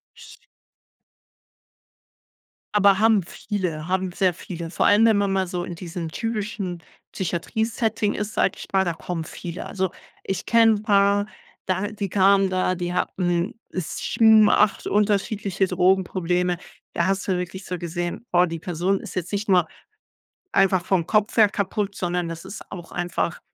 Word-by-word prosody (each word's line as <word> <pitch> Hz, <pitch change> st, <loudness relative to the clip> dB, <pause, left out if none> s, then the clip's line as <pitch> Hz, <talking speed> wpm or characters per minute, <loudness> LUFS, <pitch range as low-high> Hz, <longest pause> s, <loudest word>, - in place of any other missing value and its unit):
Sch -, -, -14 dB, 2.3 s
Aber 200 Hz, -2 st, +5 dB
haben 220 Hz, -2 st, +4 dB
viele 175 Hz, -4 st, -4 dB
haben 185 Hz, 0 st, -1 dB
sehr 185 Hz, 0 st, +1 dB
viele. 170 Hz, -1 st, -7 dB
Vor -, -, 0 dB
allem, 210 Hz, +3 st, +6 dB
wenn 220 Hz, -2 st, +5 dB
man 200 Hz, -1 st, +1 dB
mal 190 Hz, -1 st, 0 dB
so 175 Hz, 0 st, -3 dB
in 175 Hz, -, -6 dB
diesem 170 Hz, -1 st, -6 dB
typischen 210 Hz, -3 st, -4 dB, 0.3 s
Psychiatrie-Setting 220 Hz, +4 st, -1 dB
ist, 210 Hz, +1 st, -4 dB
sage -, -, +2 dB
ich -, -, -9 dB
mal, 190 Hz, -1 st, +3 dB
da 170 Hz, -, 0 dB
kommen 165 Hz, 0 st, -5 dB
viele. 170 Hz, +2 st, -7 dB
Also 190 Hz, -2 st, -2 dB, 0.3 s
ich 190 Hz, -2 st, -3 dB
kenne 230 Hz, -1 st, +5 dB
'n 205 Hz, -, -6 dB
paar, 200 Hz, -1 st, +3 dB, 0.4 s
da 190 Hz, +2 st, 0 dB
die 205 Hz, -2 st, -4 dB
kamen 195 Hz, 0 st, +4 dB
da, 185 Hz, 0 st, 0 dB
die 175 Hz, 0 st, -3 dB
hatten, 180 Hz, +3 st, -1 dB, 0.2 s
7, 215 Hz, +5 st, +4 dB
8 210 Hz, -1 st, +2 dB
unterschiedliche 200 Hz, -2 st, +1 dB
Drogenprobleme. 180 Hz, -1 st, +1 dB, 0.4 s
Da 170 Hz, -, +1 dB
hast 195 Hz, 0 st, -1 dB
du 185 Hz, -2 st, +1 dB
wirklich 185 Hz, +2 st, -5 dB
so 180 Hz, -, -4 dB
gesehen: 175 Hz, +4 st, -4 dB
„Boah, 180 Hz, 0 st, +4 dB
die 165 Hz, -1 st, -5 dB
Person 180 Hz, +3 st, -1 dB
ist -, -, -9 dB
jetzt 180 Hz, -1 st, -3 dB
nicht 205 Hz, +1 st, -2 dB
nur 180 Hz, -4 st, +4 dB, 0.9 s
einfach 190 Hz, -2 st, +3 dB
vom 185 Hz, -4 st, +1 dB
Kopf 210 Hz, +2 st, +1 dB
her 215 Hz, -2 st, +7 dB
kaputt, 200 Hz, 0 st, -2 dB
sondern 175 Hz, -1 st, -2 dB
das 165 Hz, 0 st, -7 dB
ist 210 Hz, -, -9 dB
auch 175 Hz, -3 st, -9 dB
einfach“ 175 Hz, -1 st, -2 dB
190 Hz, 160 wpm, -23 LUFS, 175-205 Hz, 2.3 s, her